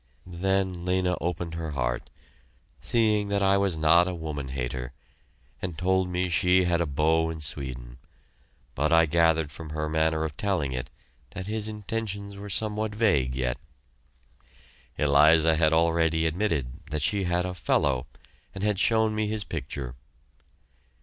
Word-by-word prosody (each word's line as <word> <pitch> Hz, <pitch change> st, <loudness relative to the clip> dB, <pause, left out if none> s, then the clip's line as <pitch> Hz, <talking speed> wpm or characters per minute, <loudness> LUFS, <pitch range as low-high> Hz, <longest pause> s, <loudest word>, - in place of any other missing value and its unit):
Then 95 Hz, 0 st, -1 dB
Lena 90 Hz, 0 st, +1 dB
opened 85 Hz, -1 st, -3 dB
her 80 Hz, -2 st, -4 dB
heart, -, -, -2 dB, 0.7 s
seeing 110 Hz, -3 st, +1 dB
that 100 Hz, 0 st, +1 dB
I 100 Hz, 0 st, +4 dB
was 100 Hz, -4 st, +1 dB
not 85 Hz, +3 st, +5 dB
a 90 Hz, -, -3 dB
woman 75 Hz, -4 st, -5 dB
hater, 65 Hz, -1 st, -4 dB, 0.7 s
and 90 Hz, -4 st, -4 dB
told 95 Hz, +1 st, +1 dB
me 90 Hz, +1 st, 0 dB
she 90 Hz, +2 st, +3 dB
had 85 Hz, -1 st, +1 dB
a 85 Hz, -, 0 dB
beau 80 Hz, +3 st, +2 dB
in 80 Hz, -1 st, -5 dB
Sweden; 65 Hz, -5 st, -5 dB, 0.7 s
but 75 Hz, +4 st, 0 dB
I 85 Hz, 0 st, +6 dB
gathered 80 Hz, -1 st, +2 dB
from 80 Hz, +1 st, -9 dB
her 75 Hz, 0 st, -3 dB
manner 80 Hz, 0 st, +1 dB
of 75 Hz, -3 st, -4 dB
telling 85 Hz, -8 st, -1 dB
it 65 Hz, 0 st, -4 dB, 0.5 s
that 95 Hz, -1 st, -5 dB
his 110 Hz, +1 st, -2 dB
intentions 105 Hz, -1 st, -4 dB
were 100 Hz, +1 st, -8 dB
somewhat 105 Hz, +1 st, -1 dB
vague 75 Hz, -, +2 dB
yet. 65 Hz, -1 st, -2 dB, 1.4 s
Eliza 80 Hz, +3 st, +5 dB
had 80 Hz, -1 st, +3 dB
already 80 Hz, 0 st, +2 dB
admitted 80 Hz, -5 st, -1 dB
that 75 Hz, -1 st, -2 dB
she 100 Hz, +3 st, 0 dB
had 90 Hz, 0 st, 0 dB
a 90 Hz, -, -3 dB
"fellow," 65 Hz, -5 st, 0 dB, 0.5 s
and 95 Hz, -, -5 dB
had 105 Hz, -3 st, +1 dB
shown 110 Hz, -1 st, +3 dB
me 110 Hz, 0 st, -1 dB
his 105 Hz, 0 st, -2 dB
picture. 65 Hz, -6 st, -5 dB
85 Hz, 150 wpm, -26 LUFS, 75-95 Hz, 1.4 s, I